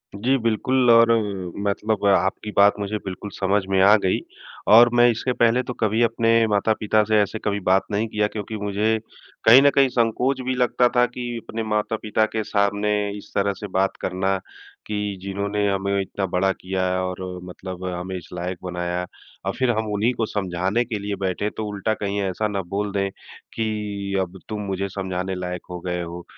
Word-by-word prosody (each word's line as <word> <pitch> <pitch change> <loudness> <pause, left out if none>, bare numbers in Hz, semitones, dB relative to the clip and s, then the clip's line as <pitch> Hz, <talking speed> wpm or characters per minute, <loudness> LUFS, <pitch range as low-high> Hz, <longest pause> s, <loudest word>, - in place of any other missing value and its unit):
जी, 125 +7 +1
बिल्कुल 125 +3 +2
और 115 0 +6 0.6
मतलब 105 +1 -1
आपकी 95 +2 +1
बात 100 +1 +5
मुझे 100 +1 -2
बिल्कुल 95 +2 -6
समझ 100 +1 +1
में 95 -1 +3
आ 100 +2 +8
गई 95 - +2 0.5
और 115 +3 +8
मैं 120 0 +6
इससे 125 +2 -2
पहले 120 +1 +3
तो 125 - -5
कभी 110 0 0
अपने 115 0 +2 0.2
माता-पिता 105 +1 +2
से 110 -1 +4
ऐसे 105 +2 -2
कभी 100 -1 0
बात 95 +1 +4
नहीं 105 +2 0
किया। 105 -1 0
क्योंकि 105 +1 -6
मुझे 105 +2 0 0.5
कहीं 120 +4 +9
न 145 - +6
कहीं 135 -1 +5
संकोच 125 +3 +1
भी 130 0 0
लगता 125 0 +3
था 120 0 +5
कि 125 0 -6 0.2
अपने 115 0 -3
माता-पिता 110 0 0
के 110 -1 -1
सामने 100 0 0 0.3
इस 100 - -12
तरह 100 0 +2
से 105 - -5
बात 95 +1 +1
करना 95 +1 0 0.5
कि 105 -1 -2
जिन्होंने 100 +1 -1
हमें 100 0 0
इतना 95 0 -3
बड़ा 95 +1 +1
किया 95 0 -3
है। 90 - 0
और 90 0 -4 0.2
मतलब 90 0 -8
हमें 90 +1 -4
इस 90 - -11
लायक 90 +1 -4
बनाया 90 0 -3 0.4
और - - -1
फ़िर 130 -2 +2
हम 110 0 -1
उन्हीं 110 +5 +1
को 115 -2 -1
समझाने 95 +2 -1
के 110 -3 -4
लिए 100 0 -3
बैठे, 95 +2 -2
तो 110 - -5
उल्टा 105 +1 -1
कहीं 100 -1 -3
ऐसा 95 +2 -1
ना 100 -2 -2
बोल 100 +3 -3
दें 100 0 0 0.4
कि 105 -3 -3
अब 95 +1 -5
तुम 105 -1 -3
मुझे 100 0 -2
समझाने 95 -1 -3
लायक 90 -1 -4
हो 90 -1 -5
गए 90 0 -3
हो। 85 0 -7
100 Hz, 190 wpm, -23 LUFS, 95-110 Hz, 0.6 s, कहीं